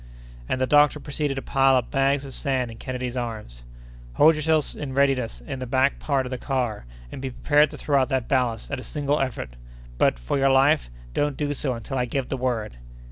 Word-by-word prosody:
And 130 Hz, -, 0 dB
the 130 Hz, -, +2 dB
doctor 150 Hz, +2 st, +4 dB
proceeded 145 Hz, -1 st, -3 dB
to 135 Hz, -, -4 dB
pile 135 Hz, -1 st, +3 dB
up 125 Hz, -2 st, 0 dB
bags 135 Hz, +1 st, +1 dB
of 135 Hz, -, -8 dB
sand 130 Hz, -4 st, -1 dB
in 115 Hz, -, -11 dB
Kennedy's 125 Hz, 0 st, -4 dB
arms. 110 Hz, -, -5 dB, 0.5 s
"Hold 155 Hz, -, +6 dB
yourself 155 Hz, 0 st, +1 dB
in 140 Hz, -3 st, -5 dB
readiness 130 Hz, -, +1 dB
in 130 Hz, -, -5 dB
the 130 Hz, -, -5 dB
back 130 Hz, +2 st, +2 dB
part 135 Hz, -3 st, 0 dB
of 125 Hz, -, -6 dB
the 130 Hz, -, -4 dB
car, 125 Hz, -, -2 dB, 0.3 s
and -, -, -7 dB
be 135 Hz, -, -3 dB
prepared 150 Hz, +4 st, +3 dB
to -, -, -9 dB
throw 140 Hz, -2 st, +2 dB
out 130 Hz, -, 0 dB
that 130 Hz, -3 st, -1 dB
ballast 125 Hz, -5 st, 0 dB
at 145 Hz, -, -2 dB
a -, -, -8 dB
single 145 Hz, 0 st, -1 dB
effort. 115 Hz, -, -3 dB, 0.4 s
But, -, -, +3 dB
for -, -, -2 dB
your 135 Hz, 0 st, +4 dB
life, 135 Hz, -, +4 dB, 0.2 s
don't 145 Hz, -2 st, 0 dB
do 145 Hz, -1 st, -1 dB
so 135 Hz, -3 st, -2 dB
until 130 Hz, +3 st, -4 dB
I 125 Hz, -, +1 dB
give 130 Hz, +1 st, -3 dB
the -, -, -1 dB
word!" 120 Hz, -, -2 dB
135 Hz, 220 wpm, -24 LUFS, 125-140 Hz, 0.5 s, Hold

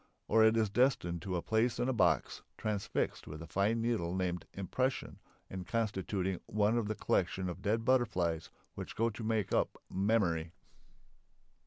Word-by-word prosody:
Or 110 Hz, -, +5 dB
it 110 Hz, +1 st, +5 dB
is 110 Hz, -3 st, +2 dB
destined 100 Hz, -9 st, +2 dB
to 90 Hz, +2 st, -3 dB
a 85 Hz, -, -2 dB
place 110 Hz, +2 st, +1 dB
in 125 Hz, -, 0 dB
a 130 Hz, -, +1 dB
box, 85 Hz, -, +2 dB, 0.2 s
transfixed 105 Hz, -2 st, -2 dB
with 75 Hz, -, -7 dB
the 85 Hz, -, -7 dB
fine 105 Hz, +7 st, +1 dB
needle 105 Hz, -7 st, 0 dB
named 90 Hz, -2 st, -2 dB
"impression" 130 Hz, +8 st, -2 dB, 0.3 s
and 95 Hz, -1 st, -7 dB
constituting 95 Hz, -4 st, -1 dB
one 105 Hz, +2 st, +2 dB
of 115 Hz, -3 st, 0 dB
the 110 Hz, -, -2 dB
collection 95 Hz, -1 st, 0 dB
of 90 Hz, -, -5 dB
dead 110 Hz, +2 st, 0 dB
butterflies 95 Hz, -11 st, +1 dB, 0.2 s
which -, -, -7 dB
go 115 Hz, +1 st, +1 dB
to 110 Hz, +2 st, -7 dB
make 110 Hz, -3 st, 0 dB
up -, -, +1 dB, 0.2 s
"memory." 90 Hz, -5 st, +1 dB
105 Hz, 165 wpm, -33 LUFS, 90-115 Hz, 0.3 s, Or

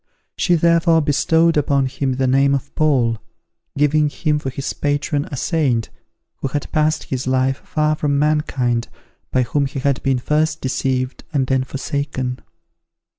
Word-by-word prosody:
She 175 Hz, -, +2 dB
therefore 170 Hz, 0 st, +4 dB
bestowed 160 Hz, +3 st, +2 dB
upon 140 Hz, -2 st, +2 dB
him 130 Hz, 0 st, -2 dB
the 130 Hz, +1 st, 0 dB
name 135 Hz, +2 st, +3 dB
of 140 Hz, +1 st, -5 dB
Paul, 125 Hz, -7 st, +2 dB, 0.6 s
giving 150 Hz, +1 st, +3 dB
him 150 Hz, +1 st, -1 dB
for 135 Hz, -, -4 dB
his 135 Hz, +1 st, -4 dB
patron 145 Hz, 0 st, -1 dB
a 140 Hz, -, -4 dB
saint 130 Hz, -8 st, 0 dB, 0.5 s
who -, -, -3 dB
had 145 Hz, +2 st, -4 dB
passed 155 Hz, 0 st, +1 dB
his 130 Hz, -1 st, -4 dB
life 130 Hz, +1 st, +1 dB
far 155 Hz, +1 st, 0 dB
from 145 Hz, -2 st, 0 dB
mankind 135 Hz, -6 st, 0 dB, 0.4 s
by 130 Hz, -, +2 dB
whom 140 Hz, +4 st, 0 dB
he 135 Hz, -, -8 dB
had 135 Hz, 0 st, 0 dB
been 135 Hz, -1 st, +1 dB
first 155 Hz, +4 st, 0 dB
deceived 130 Hz, 0 st, -2 dB
and 140 Hz, -4 st, +1 dB
then 130 Hz, 0 st, +1 dB
forsaken. 130 Hz, -1 st, -3 dB
140 Hz, 155 wpm, -20 LUFS, 130-150 Hz, 0.6 s, therefore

